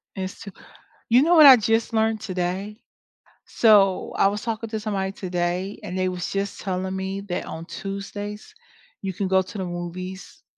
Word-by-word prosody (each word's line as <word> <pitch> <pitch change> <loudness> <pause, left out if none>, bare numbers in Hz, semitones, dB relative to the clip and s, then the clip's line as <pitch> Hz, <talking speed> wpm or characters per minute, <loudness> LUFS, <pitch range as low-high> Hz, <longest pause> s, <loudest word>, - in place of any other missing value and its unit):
It's 190 0 -5
to 200 - -8 0.6
you 245 +3 +5
know 340 +4 +4
what 310 -2 +10
I 265 -2 +11
just 225 +1 0
learned 220 -1 +1
today? 185 +2 -3 0.7
So, 200 -4 +4
I - - +5
was 205 +1 -2
talking 225 -1 -4
to 220 - -3
somebody 195 -3 -2
today 180 +1 -3
and 180 - -5
they 185 0 +1
was 180 -1 -4
just 200 0 -3
telling 190 -1 -3
me 190 +1 -3
that 180 - -2
on 160 +1 -7
Tuesdays 205 - -7 0.5
you 190 -1 -3
can 195 +1 -2
go 190 0 +4
to 190 +3 -8
the 190 - -3
movies, 180 +2 -7
195 Hz, 175 wpm, -24 LUFS, 185-215 Hz, 0.7 s, I